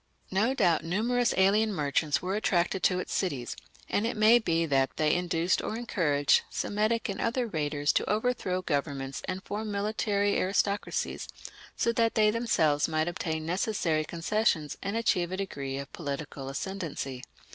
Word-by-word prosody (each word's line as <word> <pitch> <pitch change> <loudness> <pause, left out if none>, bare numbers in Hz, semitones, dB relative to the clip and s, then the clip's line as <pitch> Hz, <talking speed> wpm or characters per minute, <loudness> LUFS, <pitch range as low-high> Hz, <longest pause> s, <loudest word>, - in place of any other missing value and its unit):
No 220 +8 +2
doubt 175 -9 +3
numerous 235 +8 +1
alien 205 +3 +4
merchants 150 -3 0
were 190 +2 -1
attracted 185 -3 +1
to 180 - +3
its 180 - -4
cities, 140 -11 -2 0.3
and 210 +3 0
it 235 - -3
may 220 +3 +6
be 165 -6 +1
that 135 -3 +2
they 155 -1 +3
induced 175 0 +1
or 220 - -3
encouraged 150 -11 +2
Semitic 215 +3 0
and 200 - -4
other 240 +2 0
raiders 150 -6 0
to - - 0
overthrow 210 -4 0
governments 140 -4 -2
and 190 0 -4
form 215 +2 -4
military 205 0 0
aristocracies, 200 +2 -1 0.5
so 235 - +2
that 230 -1 +1
they 215 -1 +4
themselves 165 -11 +2
might 155 0 0
obtain 160 -3 -3
necessary 170 -3 0
concessions 165 -2 0
and 200 +3 -2
achieve 180 -6 +1
a 185 - -3
degree 140 -9 -4
of 140 +1 -7
political 140 -3 -5
ascendancy. 145 -5 -4
185 Hz, 155 wpm, -29 LUFS, 155-215 Hz, 0.5 s, may